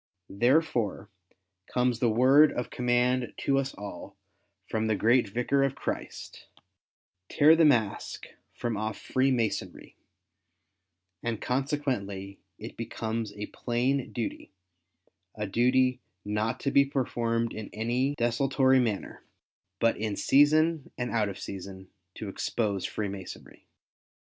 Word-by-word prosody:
Therefore, 120 Hz, -, +1 dB, 0.6 s
comes 125 Hz, -1 st, 0 dB
the 120 Hz, -, +2 dB
word 130 Hz, +7 st, +6 dB
of 125 Hz, -, -4 dB
command 125 Hz, 0 st, +1 dB
to 135 Hz, 0 st, +2 dB
us 135 Hz, 0 st, -3 dB
all, 100 Hz, -1 st, -9 dB, 0.5 s
from 110 Hz, 0 st, -1 dB
the 110 Hz, -, +2 dB
great 115 Hz, +2 st, +3 dB
Vicar 125 Hz, +6 st, +1 dB
of 135 Hz, -1 st, +1 dB
Christ -, -, -6 dB, 0.2 s
— -, -, -59 dB
" 90 Hz, 0 st, -59 dB
Tear 155 Hz, +2 st, +6 dB
the 165 Hz, -1 st, +5 dB
mask 115 Hz, -9 st, +1 dB, 0.3 s
from 120 Hz, -2 st, -3 dB
off 110 Hz, 0 st, -3 dB
Freemasonry;" 130 Hz, -4 st, -1 dB, 1.3 s
and 115 Hz, -2 st, -2 dB
consequently, 125 Hz, -8 st, -2 dB, 0.2 s
it 110 Hz, -, -9 dB
becomes 115 Hz, -1 st, -3 dB
a 105 Hz, 0 st, -5 dB
plain 125 Hz, +4 st, -1 dB
duty, 115 Hz, -4 st, -5 dB, 0.8 s
a 105 Hz, -, -3 dB
duty 125 Hz, +4 st, +2 dB, 0.2 s
not 110 Hz, +4 st, -1 dB
to 140 Hz, -, 0 dB
be 140 Hz, -, +6 dB
performed 115 Hz, -4 st, -1 dB
in 110 Hz, -2 st, -7 dB
any 125 Hz, +6 st, -1 dB
desultory 130 Hz, +2 st, +2 dB
manner, 110 Hz, -5 st, -2 dB, 0.6 s
but 115 Hz, -, +2 dB
in 105 Hz, -1 st, -2 dB
season 155 Hz, +4 st, +3 dB
and 125 Hz, 0 st, -3 dB
out 110 Hz, -3 st, +1 dB
of 100 Hz, -, -7 dB
season, 95 Hz, -1 st, -8 dB, 0.2 s
to 110 Hz, -, -6 dB
expose 100 Hz, 0 st, -2 dB
Freemasonry. 100 Hz, -3 st, -7 dB
120 Hz, 125 wpm, -28 LUFS, 105-130 Hz, 1.3 s, word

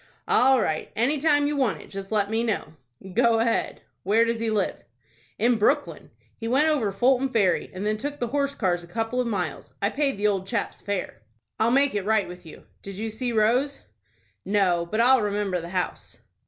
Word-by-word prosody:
"All 265 Hz, +1 st, +4 dB
right. 155 Hz, -7 st, -2 dB
Any 265 Hz, +7 st, +1 dB
time 290 Hz, -1 st, +3 dB
you 295 Hz, +1 st, 0 dB
want 260 Hz, -7 st, 0 dB
it, -, -, -14 dB
just 195 Hz, 0 st, -7 dB
let 205 Hz, -1 st, +1 dB
me 225 Hz, +1 st, +1 dB
know." 220 Hz, -7 st, -2 dB, 0.4 s
"Go 235 Hz, +1 st, +3 dB
ahead. 230 Hz, 0 st, 0 dB, 0.2 s
Where 220 Hz, +5 st, +3 dB
does 230 Hz, 0 st, -1 dB
he 230 Hz, 0 st, -1 dB
live?" 210 Hz, -3 st, -1 dB, 0.5 s
"In 235 Hz, +1 st, +2 dB
Brooklyn. 285 Hz, +7 st, 0 dB, 0.3 s
We 225 Hz, -, -4 dB
went 275 Hz, +6 st, +3 dB
over 255 Hz, -10 st, +1 dB
Fulton 255 Hz, +6 st, +2 dB
Ferry, 200 Hz, -8 st, +1 dB
and 185 Hz, +2 st, -5 dB
then 215 Hz, 0 st, 0 dB
took 290 Hz, +6 st, -5 dB
the 240 Hz, -3 st, -3 dB
horse 280 Hz, +1 st, -1 dB
cars 175 Hz, -4 st, 0 dB
a -, -, -12 dB
couple 225 Hz, +6 st, -2 dB
of 245 Hz, -, -2 dB
miles. 180 Hz, -9 st, -4 dB
I 200 Hz, +2 st, 0 dB
paid 275 Hz, -3 st, 0 dB
the 205 Hz, -, -2 dB
old 195 Hz, -2 st, +1 dB
chap's 205 Hz, -1 st, -3 dB
fare." 200 Hz, -, -4 dB, 0.4 s
"I'll 220 Hz, -, +3 dB
make 275 Hz, +3 st, +3 dB
it 205 Hz, -2 st, -1 dB
right 215 Hz, 0 st, +1 dB
with 180 Hz, -1 st, -11 dB
you. -, -, -12 dB, 0.2 s
Did 195 Hz, -1 st, -8 dB
you 220 Hz, +3 st, -4 dB
see 245 Hz, +3 st, -3 dB
Rose?" 245 Hz, +6 st, +1 dB, 0.6 s
"No; 185 Hz, -4 st, +1 dB
but 215 Hz, +6 st, 0 dB
I'll 255 Hz, +1 st, +5 dB
remember 205 Hz, -3 st, -1 dB
the 170 Hz, -, -8 dB
house." 180 Hz, 0 st, -4 dB
220 Hz, 205 wpm, -25 LUFS, 200-250 Hz, 0.6 s, I'll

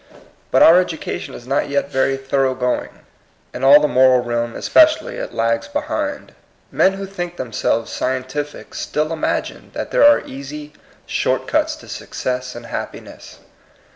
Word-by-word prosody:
But -, -, +5 dB
our 170 Hz, +2 st, +8 dB
education 165 Hz, -3 st, -5 dB
is 120 Hz, -, -11 dB
not 135 Hz, +2 st, 0 dB
yet 140 Hz, 0 st, -1 dB
very 135 Hz, 0 st, +1 dB
thorough 135 Hz, -1 st, 0 dB
going. 125 Hz, -1 st, -1 dB, 0.6 s
In 125 Hz, -, -6 dB
all 140 Hz, +2 st, +8 dB
the 150 Hz, -, +2 dB
moral 130 Hz, -2 st, +4 dB
realm 120 Hz, -1 st, -2 dB
especially -, -, +3 dB
it -, -, -5 dB
lags 115 Hz, 0 st, 0 dB
behind 295 Hz, 0 st, -3 dB, 0.4 s
Men 190 Hz, -, +3 dB
who 195 Hz, 0 st, -5 dB
think 175 Hz, -3 st, -6 dB
themselves 115 Hz, -2 st, -1 dB
scientific 130 Hz, +3 st, -4 dB
still 155 Hz, +2 st, -2 dB
imagine 160 Hz, -, -3 dB
that -, -, -4 dB
there -, -, +3 dB
are 290 Hz, 0 st, +6 dB
easy, 145 Hz, +2 st, -8 dB, 0.3 s
short -, -, -1 dB
cuts -, -, +1 dB
to -, -, -15 dB
success 125 Hz, 0 st, -4 dB
and 120 Hz, 0 st, -9 dB
happi 115 Hz, -, -6 dB
ness. -, -, -14 dB
135 Hz, 155 wpm, -19 LUFS, 125-165 Hz, 0.6 s, our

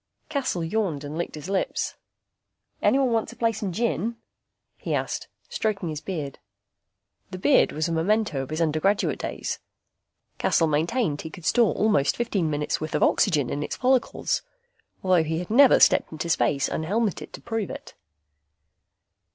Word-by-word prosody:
Cassel 265 Hz, -, -1 dB
yawned 165 Hz, -5 st, -1 dB
and 145 Hz, +1 st, -6 dB
licked 170 Hz, 0 st, -3 dB
his 150 Hz, +2 st, -8 dB
lips. 195 Hz, -1 st, -1 dB, 0.9 s
"Anyone 265 Hz, -2 st, +3 dB
want 225 Hz, -1 st, 0 dB
to -, -, -10 dB
play 230 Hz, -1 st, +1 dB
some 205 Hz, -3 st, -4 dB
gin?" 230 Hz, +2 st, -1 dB, 0.6 s
he -, -, -2 dB
asked, -, -, -3 dB, 0.2 s
stroking 200 Hz, -5 st, -2 dB
his 155 Hz, -1 st, -5 dB
beard. 150 Hz, -8 st, -5 dB, 0.9 s
The 185 Hz, -, -6 dB
beard 265 Hz, +9 st, +4 dB
was 155 Hz, +2 st, -1 dB
a -, -, -3 dB
memento 170 Hz, -2 st, +1 dB
of 135 Hz, -, -6 dB
his 155 Hz, +2 st, -2 dB
undergraduate 165 Hz, +6 st, +1 dB
days. -, -, -4 dB, 0.8 s
Cassel 165 Hz, -, +3 dB
maintained 160 Hz, -, 0 dB
he 160 Hz, -, -7 dB
could 160 Hz, +1 st, -11 dB
store 230 Hz, +7 st, +3 dB
almost 210 Hz, -10 st, +2 dB
fifteen 200 Hz, -9 st, 0 dB
minutes 150 Hz, 0 st, -1 dB
worth 155 Hz, -, -3 dB
of -, -, +2 dB
oxygen 150 Hz, -10 st, +2 dB
in 145 Hz, -, -2 dB
its -, -, -3 dB
follicles. 255 Hz, 0 st, +1 dB, 0.6 s
He 165 Hz, -4 st, +2 dB
had 180 Hz, +4 st, -5 dB
never 270 Hz, +3 st, +7 dB
stepped -, -, +4 dB
into 160 Hz, +2 st, -4 dB
space 145 Hz, -3 st, +2 dB
unhelmeted 200 Hz, +6 st, -1 dB
to -, -, -8 dB
prove 225 Hz, -4 st, -3 dB
it. -, -, -8 dB
180 Hz, 155 wpm, -25 LUFS, 155-220 Hz, 0.9 s, never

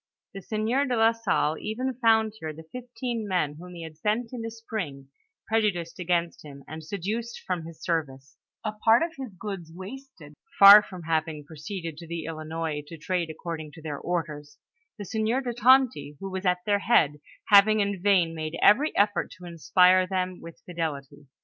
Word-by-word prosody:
The 195 Hz, -, -7 dB
sieur 220 Hz, +7 st, 0 dB
de 250 Hz, -, 0 dB
la 225 Hz, 0 st, +4 dB
Sdlle 190 Hz, -8 st, 0 dB
even 255 Hz, +5 st, -3 dB
found 220 Hz, -3 st, +3 dB
here 160 Hz, -4 st, -5 dB
the 160 Hz, +1 st, -12 dB
fifteen 240 Hz, -2 st, -5 dB
men, 155 Hz, -6 st, -1 dB
whom 180 Hz, +1 st, -10 dB
he 170 Hz, -, -7 dB
had 160 Hz, -1 st, -10 dB
sent 225 Hz, +5 st, -1 dB
in 245 Hz, -, -5 dB
the 225 Hz, -, -4 dB
spring, 190 Hz, -12 st, -6 dB, 0.4 s
prejudiced 205 Hz, -7 st, -1 dB
against 170 Hz, -1 st, -1 dB
him, 140 Hz, -2 st, -11 dB
and 155 Hz, +1 st, -8 dB
seduced 210 Hz, +7 st, -4 dB
from 180 Hz, -3 st, -3 dB
his 165 Hz, 0 st, -11 dB
service; 140 Hz, -5 st, -3 dB, 0.3 s
a 215 Hz, -, -1 dB
part 225 Hz, +5 st, +3 dB
of 335 Hz, -1 st, -3 dB
his 265 Hz, -5 st, -7 dB
goods 190 Hz, -6 st, -6 dB
wasted, 190 Hz, -, -11 dB, 0.2 s
far 200 Hz, +1 st, +11 dB
from 185 Hz, -4 st, -10 dB
having 160 Hz, -2 st, -2 dB
proceeded 165 Hz, +1 st, -7 dB
to 170 Hz, 0 st, -10 dB
the 170 Hz, -1 st, -5 dB
Ilinois 160 Hz, -1 st, -4 dB
to 165 Hz, -, -9 dB
trade 175 Hz, +1 st, -2 dB
according 160 Hz, -1 st, -6 dB
to 165 Hz, -, -12 dB
their 150 Hz, -3 st, -5 dB
orders; 155 Hz, -4 st, -4 dB, 0.4 s
the 205 Hz, -, -7 dB
sieur 220 Hz, +5 st, 0 dB
de 250 Hz, -3 st, -3 dB
Tonty, 235 Hz, -, +3 dB
who 195 Hz, 0 st, -6 dB
was 190 Hz, 0 st, -3 dB
at 180 Hz, 0 st, 0 dB
their 205 Hz, -1 st, +2 dB
head, 150 Hz, -10 st, +2 dB, 0.3 s
having 210 Hz, +1 st, +7 dB
in 200 Hz, -2 st, -1 dB
vain 185 Hz, -4 st, +3 dB
made 155 Hz, 0 st, -5 dB
every 280 Hz, +9 st, +4 dB
effort 205 Hz, 0 st, +2 dB
to 180 Hz, -, -12 dB
inspire 180 Hz, +2 st, +4 dB
them 185 Hz, -1 st, -2 dB
with 165 Hz, -1 st, -12 dB
fidelity. 150 Hz, -5 st, -5 dB
180 Hz, 180 wpm, -26 LUFS, 160-220 Hz, 0.4 s, far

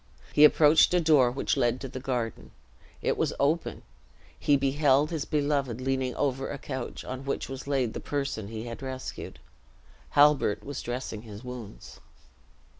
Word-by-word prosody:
He 150 Hz, -, +6 dB
approached 155 Hz, +3 st, +6 dB
a -, -, +5 dB
door 150 Hz, -7 st, +5 dB
which 130 Hz, +3 st, -1 dB
led 120 Hz, 0 st, +2 dB
into 135 Hz, +1 st, -7 dB
the 130 Hz, 0 st, -7 dB
garden. 125 Hz, -4 st, -3 dB, 0.5 s
It -, -, +1 dB
was -, -, 0 dB
open. 155 Hz, +4 st, 0 dB, 0.6 s
He 145 Hz, -, +3 dB
beheld 140 Hz, +2 st, +2 dB
his 155 Hz, -3 st, -2 dB
beloved 140 Hz, -5 st, 0 dB
leaning 130 Hz, -1 st, -1 dB
over 135 Hz, -1 st, -1 dB
a 145 Hz, -, -4 dB
couch, 130 Hz, -2 st, -6 dB
on 130 Hz, +1 st, -6 dB
which 140 Hz, -, -3 dB
was 135 Hz, +1 st, -7 dB
laid 130 Hz, -5 st, 0 dB
the -, -, -4 dB
person 140 Hz, -8 st, -3 dB
he 110 Hz, +1 st, -6 dB
had 115 Hz, +1 st, -7 dB
rescued. 130 Hz, -1 st, -6 dB, 0.8 s
Halbert 145 Hz, -7 st, +4 dB
was 140 Hz, -1 st, -5 dB
dressing 120 Hz, -3 st, -5 dB
his 110 Hz, 0 st, -10 dB
wounds. 120 Hz, -, -9 dB
135 Hz, 160 wpm, -28 LUFS, 125-145 Hz, 0.8 s, He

